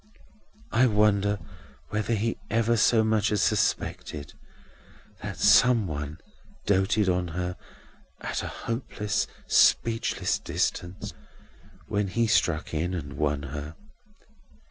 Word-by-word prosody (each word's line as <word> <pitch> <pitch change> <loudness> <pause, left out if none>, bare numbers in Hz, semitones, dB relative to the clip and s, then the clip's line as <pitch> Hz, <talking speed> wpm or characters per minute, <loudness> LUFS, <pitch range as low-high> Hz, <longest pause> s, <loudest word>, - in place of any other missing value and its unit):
"I 125 +3 +4
wonder 105 -2 +2 0.5
whether 105 +3 0
he 115 +2 -1
ever 115 +2 +2
so 110 +1 +4
much 110 0 +1
as 105 - +2
suspected 75 -1 -1 0.9
that - - -5
some 120 -4 +5
one 75 -2 -5 0.5
doted 100 +1 +2
on 90 -1 +1
her, 90 +2 -3 0.7
at - - -3
a - - -4
hopeless, 115 -3 -3 0.2
speechless 115 -1 +2
distance, 95 +2 -3 0.7
when 100 -1 -1
he 115 +5 +1
struck 95 -9 +1
in 85 +4 -1
and 70 -6 -6
won 75 -1 -1
her. 75 +1 -6
100 Hz, 110 wpm, -27 LUFS, 85-110 Hz, 0.9 s, some